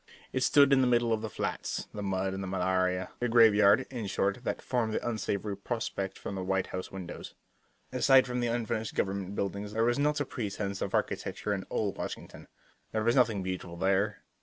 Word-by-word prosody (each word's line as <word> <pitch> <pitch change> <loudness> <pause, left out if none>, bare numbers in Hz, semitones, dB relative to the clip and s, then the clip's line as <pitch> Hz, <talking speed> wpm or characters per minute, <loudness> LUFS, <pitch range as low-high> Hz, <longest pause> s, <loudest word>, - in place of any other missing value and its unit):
It 130 - 0
stood 140 +1 +6
in 135 - +5
the 130 - +3
middle 120 -1 +3
of 110 - -1
the 110 - -4
flats, - - -3
the 105 - -5
mud 95 -1 -1
and 95 - -4
the 95 - -4
malaria 95 0 0
the 120 - 0
graveyard, 105 -3 +6
in 120 -5 -4
short, 100 +4 -1
that - - -2
formed 115 -4 -1
the - - -2
unsavory 105 -3 -2
prospect 100 -2 -3
from - - -6
the 95 -1 -3
White 95 0 0
House 90 0 -4
windows. 95 -2 -8 0.6
Aside 130 +1 +5
from 125 -1 -2
the 120 - +1
unfinished 115 -1 -2
government 100 0 -2
buildings 100 +1 -3
there 115 +1 +1
was 120 +3 +2
not 150 +1 +2
a 145 - 0
pretense 100 -5 -4
of - - -1
architecture 105 - -1
in 95 -2 -3
all 105 -2 0
Washington. - - -7 0.4
There 110 -1 0
was 115 +2 +3
nothing 115 -7 +3
beautiful 90 -2 -5
there. 95 +3 +1
105 Hz, 200 wpm, -30 LUFS, 95-120 Hz, 0.6 s, stood